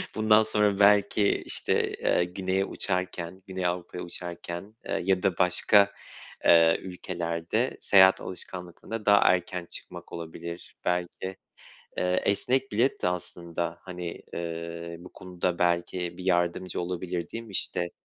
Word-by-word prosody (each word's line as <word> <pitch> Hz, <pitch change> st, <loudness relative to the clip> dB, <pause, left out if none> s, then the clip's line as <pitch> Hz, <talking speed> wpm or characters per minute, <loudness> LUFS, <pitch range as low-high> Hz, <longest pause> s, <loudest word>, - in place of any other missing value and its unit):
Bundan 110 Hz, 0 st, +5 dB
sonra 105 Hz, -2 st, +1 dB
belki 100 Hz, 0 st, +4 dB
işte, -, -, +1 dB
eee, 90 Hz, -, +2 dB
güneye 95 Hz, +2 st, -1 dB
uçarken 90 Hz, -1 st, -3 dB
Güney 95 Hz, -1 st, -3 dB
Avrupa'ya 90 Hz, 0 st, -2 dB
uçarken, 85 Hz, +3 st, -6 dB
eee, -, -, -1 dB
ya 95 Hz, -1 st, +2 dB
da 95 Hz, -4 st, +1 dB
başka, 100 Hz, +2 st, +4 dB, 0.5 s
eee, 85 Hz, -1 st, +6 dB
ülkelerde 90 Hz, +4 st, -2 dB
seyahat 95 Hz, -1 st, +6 dB
alışkanlıklarına 95 Hz, +4 st, -7 dB
daha 100 Hz, 0 st, +7 dB
erken 90 Hz, 0 st, +2 dB
çıkmak -, -, -8 dB
olabilir 85 Hz, +1 st, -7 dB
belki. 90 Hz, +1 st, -2 dB, 0.6 s
Eee, 90 Hz, 0 st, +1 dB
esnek 125 Hz, +6 st, +1 dB
bilet 120 Hz, +6 st, +1 dB
de 90 Hz, -, +3 dB
aslında, 85 Hz, -1 st, -4 dB
hani, 90 Hz, -2 st, -6 dB
eee, 85 Hz, 0 st, -5 dB
bu 90 Hz, -, -12 dB
konuda 90 Hz, -1 st, -3 dB
belki 85 Hz, 0 st, 0 dB
bir 90 Hz, -, -7 dB
yardımcı 90 Hz, 0 st, 0 dB
olabilir, 90 Hz, -1 st, -3 dB
değil 115 Hz, 0 st, -5 dB
mi, 110 Hz, -, -13 dB
işte? 85 Hz, -2 st, -1 dB
90 Hz, 130 wpm, -28 LUFS, 85-95 Hz, 0.6 s, daha